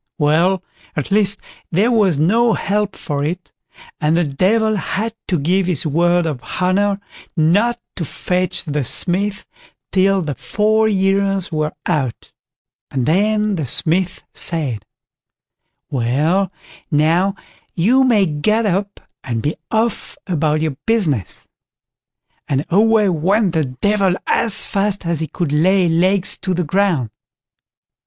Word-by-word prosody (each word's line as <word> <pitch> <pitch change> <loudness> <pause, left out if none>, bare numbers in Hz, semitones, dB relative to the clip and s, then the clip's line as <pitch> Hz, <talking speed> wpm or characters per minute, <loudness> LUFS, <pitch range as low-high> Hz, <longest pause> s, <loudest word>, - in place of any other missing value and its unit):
Well, 165 +5 +2 0.3
at 150 +5 -3
last 200 -1 +3 0.3
there 200 +8 +2
was 200 -9 +3
no 225 +9 +3
help 205 0 -1
for 145 -3 -3
it, 175 +5 -4 0.5
and 155 +2 +1
the 175 - +3
Devil 215 +10 +1
had 220 +4 -3
to 180 - +1
give 180 +5 +1
his 175 -5 +1
word 175 +3 +2
of 145 -6 -3 0.2
honour 195 +2 +1 0.4
not 205 +10 +2 0.2
to 175 - -2
fetch 180 +4 -2
the 150 -3 -2
Smith 195 - -1 0.5
till 195 0 +2
the 150 -2 -3
four 215 - +1
years 195 -1 +1
were 155 -1 -1
out; 140 -9 -2 0.6
and 130 -3 -2
then 210 +5 +1
the 150 -5 -3
Smith 175 +8 -1
said: 145 - 0 1.1
"Well 150 +10 +1 0.4
now, 170 +5 +2 0.4
you 235 +10 +3
may 225 -6 +3
get 215 +9 0
up 200 +1 -1 0.2
and 115 -3 -3
be 150 - -1
off 225 +1 -1
about 155 -4 0
your 155 -3 -1
business", 165 - -1 1.0
and 140 +1 -1
away 215 +2 +4
went 185 +3 +1
the 160 -3 +1
Devil 190 +8 0
as 225 -4 +2
fast 200 -2 0
as 170 -2 0
he 160 - -2
could 165 -3 -3
lay 180 +5 +3
legs 185 +3 +3
to 185 -2 -2
the 180 - 0
ground. 165 - 0
180 Hz, 135 wpm, -18 LUFS, 155-200 Hz, 1.1 s, away